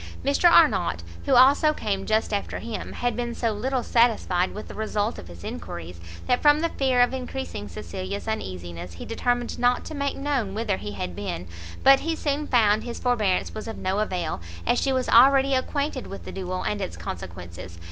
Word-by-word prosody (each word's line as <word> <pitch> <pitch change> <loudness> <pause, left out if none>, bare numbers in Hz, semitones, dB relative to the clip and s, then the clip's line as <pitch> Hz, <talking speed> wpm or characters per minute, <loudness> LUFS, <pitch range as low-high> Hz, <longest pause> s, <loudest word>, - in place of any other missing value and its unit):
Mr 285 +5 +5
Arnott, 190 - +4 0.2
who - - +3
also 280 +4 +6
came 195 -7 -3
just 220 0 +1
after 200 - -2
him, 230 -1 -6
had 245 -2 -1
been 240 0 -3
so 230 -2 0
little 250 +4 -1
satisfied 215 -6 +2
with 210 - -8
the - - -9
result 215 0 -2
of 85 - -10
his 85 -1 -12
enquiries, 85 +1 -7 0.3
that 250 - +1
from 295 +1 +5
the 335 - +1
fear 260 -4 +2
of 245 - +3
encreasing 260 - -5
Cecilia's 185 - -6
uneasiness, 90 - -5
he 85 - -8
determined 245 +1 -1
not 245 0 +2
to - - -7
make 280 -1 -2
known 270 -8 -1
whither 215 -3 -1
he 105 0 -6
had 90 -3 -5
been; 90 -2 -5 0.4
but 270 0 +8
he 325 +1 -2
soon 295 -1 -2
found 215 -4 +3
his 240 -1 -6
forbearance 220 -7 +1
was 215 0 -6
of 225 - -6
no 190 +2 -1
avail, 180 - -2 0.2
as 245 - +2
she 275 - +1
was 260 -1 0
already 270 +3 +6
acquainted 280 +1 -1
with 195 - -9
the - - -6
duel 185 -1 -4
and 210 -1 -2
its 85 - -4
consequences. 85 0 -8
220 Hz, 195 wpm, -25 LUFS, 180-260 Hz, 0.4 s, but